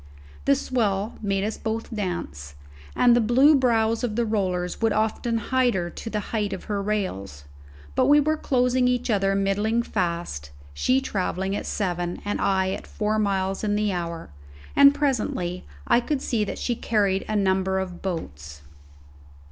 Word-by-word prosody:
The 140 - +5
swell 210 - -1
made 195 -2 0
us 215 +1 -3
both 225 +1 -4
dance, 75 - -4 0.4
and 240 -1 +5
the 240 - +4
blue 255 +7 +5
brows 230 -4 +2
of 225 -4 -1
the 235 0 +1
rollers 185 -4 -1
would 225 -2 +2
often 220 +2 0
hide 250 +1 +1
her 175 -2 -2
to 225 - -7
the 215 - -2
height 210 -3 0
of - - -6
her 205 -1 -2
rails; 185 - -3 0.5
but - - +2
we 295 +1 +6
were 310 +2 +2
closing 250 -3 +1
each 250 -1 0
other 195 -1 +2
middling 205 +4 +1
fast 170 - -3 0.2
she 255 - +2
travelling 190 -4 -2
at - - -4
seven 175 -3 -2
and 205 - -2
I 190 -1 +1
at - - -6
four 215 0 -1
miles 195 -1 0
in 205 -1 +1
the 210 -1 +1
hour, 170 - -5 0.4
and 280 0 +8
presently 220 -11 -1 0.2
I - - +4
could 265 +3 -2
see 225 -3 0
that - - -5
she 245 - -1
carried 200 -4 +1
a 215 - -1
number 190 -1 +1
of 185 -2 -4
boats. 75 - -6
205 Hz, 170 wpm, -24 LUFS, 185-235 Hz, 0.5 s, and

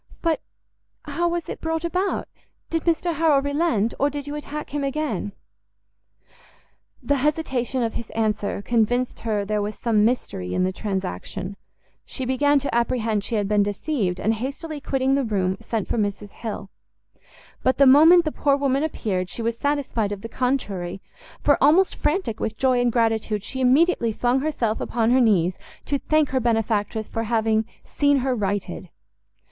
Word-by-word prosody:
"But 330 -2 +1 0.6
how 345 0 -1
was 345 -1 -3
it - - -6
brought 325 0 -2
about? 365 +3 -1 0.4
did 330 -1 -1
Mr 340 +1 +1
Harrel 315 -3 +4
relent? 285 -6 0
or 285 - +3
did 285 -1 -5
you 290 - -5
attack 300 0 -6
him 290 -1 -2
again?" 275 - -2 1.7
The 285 - +1
hesitation 265 -3 0
of 225 - -1
his 230 - -6
answer 210 -2 -1
convinced 240 +2 +1
her 215 -3 -1
there 210 0 0
was 210 +1 -4
some 220 -3 +2
mystery 210 - -1
in 185 - +2
the 185 0 0
transaction; 190 - -4 0.5
she 260 - -5
began 285 +3 +3
to 280 - -3
apprehend 230 -3 0
she 230 - -3
had 205 -2 0
been 210 0 +3
deceived, 200 - -1
and 220 - +1
hastily 280 +6 -5
quitting 270 -1 0
the 275 0 +2
room, 190 -5 0
sent 225 -4 -3
for - - -1
Mrs 205 -1 -2
Hill: 210 -3 -6 0.9
but 260 - +2
the 280 - +6
moment 320 +6 +7
the 310 - 0
poor 285 -1 +2
woman 275 -1 +1
appeared, 195 - -2
she 230 - -5
was 230 0 0
satisfied 265 -6 -1
of 200 -1 -5
the 230 - -6
contrary, 205 -9 -2 0.4
for, 285 - +3
almost 335 +7 +5
frantic 300 - -1
with 220 0 -3
joy 255 -2 +2
and 245 -1 +2
gratitude, 225 -3 0
she 260 +4 -4
immediately 260 -1 +3
flung 245 +4 +1
herself 255 -7 -1
upon 230 -1 +1
her 255 +1 +5
knees, 185 -6 +2 0.3
to 285 -1 -1
thank 310 0 +2
her 265 - +1
benefactress 220 -2 0
for 225 0 -3
having 220 -1 +1 0.2
seen 285 -1 +2
her 260 - +2
righted. 205 -3 -3
245 Hz, 170 wpm, -23 LUFS, 215-285 Hz, 1.7 s, moment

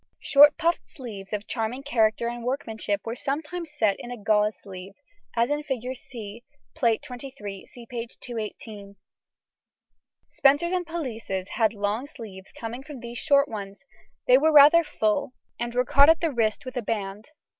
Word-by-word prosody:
Short 295 0 +7
puffed 335 +1 0
sleeves 210 -8 -9
of 210 -1 -3
charming 240 +3 -3
character 230 -4 +2
and 240 0 -5
workmanship 220 -5 -2
were 230 +1 -3
sometimes 310 +6 -4
set 220 -10 +1
in 240 - -8
a 245 - -6
gauze 210 0 +2
sleeve, 190 0 -10 0.4
as 235 +3 +2
in 295 0 0
Fig. 260 -3 -3
C, 230 -3 -9 0.3
Plate 230 -2 +1
XXIII 240 -6 -8
(see 240 -1 -13
p. 235 0 -5
218). 210 -3 -7 1.3
Spencers 285 +6 +3
and 360 -2 -1
pelisses 230 - -4
had 220 -1 +1
long 205 +6 -2
sleeves 205 -9 -11
coming 235 +2 -5
from 280 -3 -10
these 235 -1 -6
short 280 0 +4
ones; 200 -1 -8 0.4
they 255 +1 +6
were 315 +2 +4
rather 300 +3 +8
full, 260 0 -1 0.3
and 240 0 -3
were 250 0 +2
caught 280 +3 +6
at 325 - +5
the 330 -2 0
wrist 220 -1 0
with 255 +1 -7
a - - 0
band. 210 0 -4
240 Hz, 165 wpm, -26 LUFS, 215-280 Hz, 1.3 s, rather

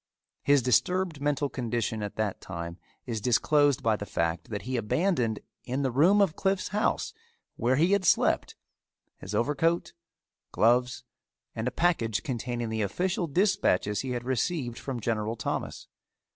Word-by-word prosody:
His 140 -2 +4
disturbed 165 - +1
mental 145 0 +1
condition 120 -4 -2
at 105 -1 -5
that 110 -3 -2
time 85 -1 -6 0.3
is 115 -3 -3
disclosed 145 +4 +3
by 110 -1 +3
the 105 -1 -6
fact 85 0 -2
that 105 -2 -4
he 130 +2 -3
abandoned 120 - 0 0.2
in 130 +3 -2
the 130 - 0
room 175 +11 +5
of 190 -6 +2
Cliffe's 195 -1 0
house, 210 +2 0 0.4
where 125 +2 +1
he 165 +7 +3
had 200 -1 +3
slept, - - +2 0.6
his 100 +3 -6
overcoat, 150 +8 +1 0.6
gloves, 125 +2 +2 0.5
and 110 +2 -3
a - - 0
package 115 - +1
containing 120 -2 -3
the 110 0 -2
official 175 - -1
dispatches 155 - +1
he 130 - -5
had 125 -1 -3
received 130 0 -1
from 130 -3 -4
General 110 0 -1
Thomas. - - -4
125 Hz, 150 wpm, -28 LUFS, 110-155 Hz, 0.6 s, room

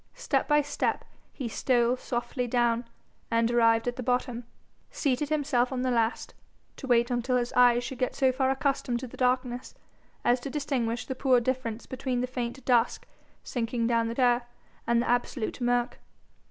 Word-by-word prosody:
Step - - 0
by 295 -1 +4
step 290 - -2 0.3
he 260 - -5
stole 240 +1 +2
softly 250 0 -3
down, 240 0 +1 0.4
and, 230 0 +2
arrived 230 -1 +3
at 245 - -2
the - - -3
bottom, 245 -1 -1 0.4
seated 280 0 -1
himself 280 -5 +1
on 255 -1 -2
the 255 - +1
last 230 -1 0 0.4
to 270 - -8
wait 240 0 +3
until 245 +1 +1
his 240 -1 -2
eyes 245 -1 +5
should 250 +1 -6
get 255 - -1
so 265 -2 +3
far 260 0 0
accustomed 265 -2 0
to 260 - -6
the 240 - -11
darkness 250 -1 -1 0.5
as 245 +1 +4
to 260 - -6
distinguish 250 -5 -2
the - - -3
poor 260 -1 +3
difference 240 -2 -3
between 260 -1 -3
the 250 - 0
faint 250 0 -5
dusk 240 -2 +2 0.4
sinking 235 -1 -2
down 230 -1 +2
the 230 - -4
stair 245 -1 +2 0.4
and 235 0 +3
the - - -4
absolute 245 0 -1
murk. 245 0 0
245 Hz, 175 wpm, -28 LUFS, 235-260 Hz, 0.5 s, eyes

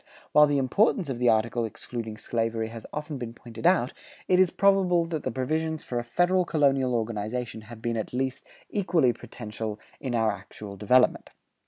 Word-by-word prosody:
[132:1] - - -35 0.2
While 150 0 +7
the 145 -1 +1
importance 180 - +2
of 120 - -4
the 125 -1 +4
article 115 +1 +2
excluding 115 0 -6
slavery 115 -1 -1
has 115 -1 -8
often 150 -2 -5
been 120 -1 -6
pointed 120 +6 -3
out, 170 -9 +3 0.3
it 180 0 +4
is 185 -2 +6
probable 185 -3 +3
that 165 -2 -3
the - - -2
provisions 155 +5 -2
for 120 - -2
a - - -3
federal 175 +9 +2
colonial 135 -6 +2
organization 110 +1 -3
have 115 -2 -11
been 120 -1 -1
at 110 - -3
least 130 +1 -2 0.3
equally 170 -10 +2
potential 110 -2 -6 0.2
in 130 -3 -3
our 110 -1 +3
actual 100 0 -9
development. 125 +6 +3
125 Hz, 180 wpm, -27 LUFS, 115-155 Hz, 0.3 s, While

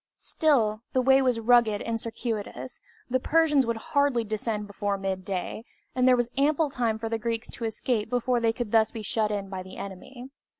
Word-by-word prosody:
Still, 225 -9 +1
the 255 - +3
way 265 +1 +5
was 250 -3 +1
rugged 230 -2 +4
and 230 0 -2
circuitous, 225 -2 -5 0.3
the 255 +1 +1
Persians 295 -3 +3
would 230 -1 -1
hardly 280 0 +1
descend 215 0 -3
before 200 0 -2
midday, 190 +1 -3 0.3
and 255 0 +2
there 255 - +7
was 240 -1 +1
ample 295 +1 +2
time 230 -4 0
for 225 +1 -4
the 225 0 -2
Greeks 230 +1 -3
to 230 - -5
escape 225 0 -1
before 245 0 +1
they 230 -1 +2
could 225 -2 -5
thus 220 -1 +4
be 225 - -6
shut 215 +1 0
in 200 -2 -3
by 190 -1 -5
the 185 0 -11
enemy. 245 +7 -9
230 Hz, 195 wpm, -27 LUFS, 210-255 Hz, 0.3 s, there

